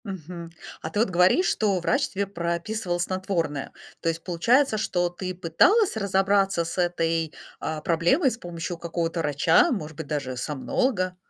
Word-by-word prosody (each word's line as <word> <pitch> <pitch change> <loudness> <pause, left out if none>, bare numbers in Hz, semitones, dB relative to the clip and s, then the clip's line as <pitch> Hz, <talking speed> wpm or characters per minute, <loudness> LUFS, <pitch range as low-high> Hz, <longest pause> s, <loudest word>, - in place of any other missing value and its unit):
Мгм. 170 -3 -7 0.3
А - - -4
ты 205 - -2
вот 225 - +3
говоришь, 180 - +4
что 200 -4 +1
врач 265 +10 +1
тебе 200 +1 -2
прописывал 175 +1 -2
снотворное. 175 -5 -2 0.3
То 165 - +1
есть 165 0 -3
получается, 225 +8 +2
что 175 -4 0
ты 185 +1 -5
пыталась 290 - +3
разобраться 195 -3 +2
с 170 - -6
этой, 165 -2 0 0.3
а, 155 -1 -4
проблемой 175 - +2
с 230 - -5
помощью 175 -3 -5
какого-то 170 0 -2
врача, 160 - +3
может 160 -9 -4
быть 160 -3 -6
даже 140 -4 -3
сомнолога. 180 - -1
175 Hz, 155 wpm, -25 LUFS, 165-200 Hz, 0.3 s, говоришь